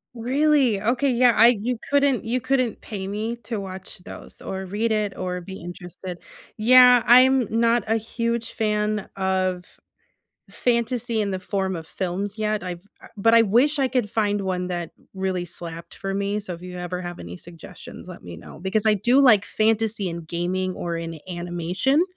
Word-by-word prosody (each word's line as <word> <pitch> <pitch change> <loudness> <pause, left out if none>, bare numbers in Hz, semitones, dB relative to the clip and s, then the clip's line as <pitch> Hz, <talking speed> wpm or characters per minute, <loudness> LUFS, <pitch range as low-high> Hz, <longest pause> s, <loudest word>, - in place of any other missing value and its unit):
Really? 260 -2 +2
Okay. 250 +5 +1
Yeah, 245 0 +4
I 230 +2 +7
you 245 +2 -2
couldn't 280 -4 +2
you 245 +2 -1
couldn't 255 -3 0
pay 195 -3 -6
me 215 +4 -3
to 225 -4 -4
watch 190 -1 -8
those, - - -12
or 190 0 -5
read 215 +4 -1
it, 210 -3 0
or 180 -1 -3
be 190 +2 -9
interested. 175 +1 -8 0.4
Yeah, 250 +1 +7
I'm 255 0 +6
not 235 -1 +3
a 225 - +2
huge 230 +1 -3
fan 210 -1 -1
of 185 -1 -1 0.8
fantasy 235 -1 0
in 200 -2 -1
the 185 - -3
form 190 -2 -2
of 160 - -8
films 195 +3 -3
yet, 215 -1 -1
I've 175 -1 -5 0.4
but 225 +3 +4
I 230 - +7
wish 250 +9 +3
I 265 - +2
could 250 -5 0
find 205 -2 0
one 180 -1 -2
that 175 -2 -4 0.2
really 190 -2 -2
slapped 170 -1 -7
for 195 0 -4
me. 200 +1 -1
So 185 -4 -6
if 170 - -12
you 180 0 -8
ever 180 +1 -4
have 175 0 -6
any 85 +1 -8
suggestions, 170 - -12
let - - -10
me 85 -1 -9
know. - - -12
Because 200 +3 -1
I 215 - +5
do 240 +7 +3
like 220 -7 +6
fantasy 220 -2 0
in 170 0 -5
gaming 175 +3 -2
or 170 -1 -3
in 165 -1 -5
animation, 175 - 0
205 Hz, 180 wpm, -23 LUFS, 180-235 Hz, 0.8 s, I